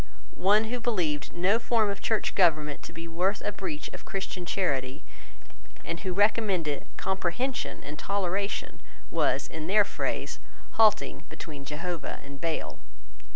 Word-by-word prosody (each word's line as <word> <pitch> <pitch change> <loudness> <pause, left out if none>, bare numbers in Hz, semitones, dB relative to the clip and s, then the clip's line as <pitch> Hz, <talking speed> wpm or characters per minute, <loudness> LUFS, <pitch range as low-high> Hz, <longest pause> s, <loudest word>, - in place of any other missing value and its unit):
One 205 +3 +5
who 240 +3 -2
believed 175 - 0
no 190 +6 +3
form 225 -3 +3
of 200 - -5
church 220 -2 +1
government 155 -6 +3
to - - -8
be 165 0 -7
worth 180 +5 +1
a - - +1
breach 185 -7 -4
of - - -8
Christian 190 -2 -4
charity, 135 -10 0 0.8
and 170 0 -3
who 190 - -2
recommended 190 -6 +2
comprehension 190 +8 -1
and 150 +1 -7
toleration, 200 0 -1 0.3
was - - +2
in 160 -1 -5
their 210 +3 +6
phrase, - - -2 0.3
halting 215 -1 +4
between 145 -4 -8
Jehovah 165 +1 -3
and 140 0 -10
Baal. 165 -2 -2
185 Hz, 140 wpm, -29 LUFS, 160-205 Hz, 0.8 s, their